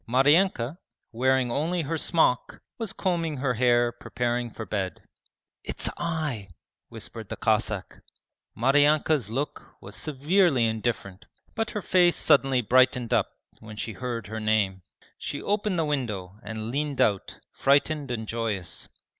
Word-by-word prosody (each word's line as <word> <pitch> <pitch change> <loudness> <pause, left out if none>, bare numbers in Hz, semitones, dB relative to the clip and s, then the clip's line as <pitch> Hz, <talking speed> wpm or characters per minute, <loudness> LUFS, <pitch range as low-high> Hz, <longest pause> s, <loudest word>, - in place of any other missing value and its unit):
Maryanka, 145 +2 +3 0.3
wearing 130 +1 +2
only 165 +6 0
her 160 +3 -2
smock, 160 -6 +1 0.2
was 225 -3 -2
combing 165 -5 -1
her 130 -1 0
hair 120 0 +3
preparing 120 0 -2
for 110 0 -7
bed. 95 -2 -3 0.6
'It's - - -2
I 155 -11 -3 0.2
' - - -59
whispered 110 -3 -7
the - - -4
Cossack. 110 -3 -1 0.6
Maryanka's 145 0 +3
look 135 +6 -4
was - - -11
severely 150 -2 +2
indifferent, 110 -3 -2 0.3
but 225 0 -1
her 210 - -4
face 175 -2 +4
suddenly 135 -2 +3
brightened 125 0 +3
up - - +2 0.3
when 110 -1 -10
she 110 +1 -3
heard 120 -3 -4
her 110 +1 -5
name. 105 -3 +1 0.4
She - - -4
opened 205 -2 0
the 165 - +1
window 105 -10 -3
and 110 +1 -5
leant 145 +1 -2
out, 100 -2 +1 0.2
frightened 145 +1 +2
and 110 -3 -3
joyous. 110 -6 -3
125 Hz, 140 wpm, -26 LUFS, 110-150 Hz, 0.6 s, face